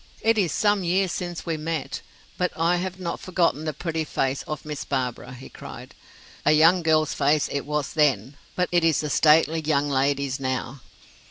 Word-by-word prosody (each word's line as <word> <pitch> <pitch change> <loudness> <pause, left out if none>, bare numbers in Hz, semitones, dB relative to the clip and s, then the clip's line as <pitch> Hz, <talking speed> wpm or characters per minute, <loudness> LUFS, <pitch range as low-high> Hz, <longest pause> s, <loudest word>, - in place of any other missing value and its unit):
"It 225 0 +3
is 180 -6 +1
some 205 -2 +2
years 185 +1 +1
since 175 -2 -5
we 165 -2 -2
met, 155 -3 -4 0.3
but 180 0 0
I 170 +2 +2
have 185 +1 -4
not 170 -2 -4
forgotten 170 -4 0
the 155 - -1
pretty 160 +2 -3
face 135 -3 -1
of 150 -1 -5
Miss 150 -2 -5
Barbara," 125 -2 -3
he 130 +1 -10
cried. - - -11 0.5
"A 155 - +4
young 165 +4 +5
girl's 155 -2 +2
face 145 +1 +2
it 140 0 -3
was 150 -2 -2
then, 145 -2 +1 0.2
but 180 0 +1
it 175 -1 +3
is 165 -2 +2
a 150 - -3
stately 160 +2 +4
young 145 -2 +1
lady's 140 0 0
now." 130 0 -3
155 Hz, 185 wpm, -24 LUFS, 140-175 Hz, 0.5 s, young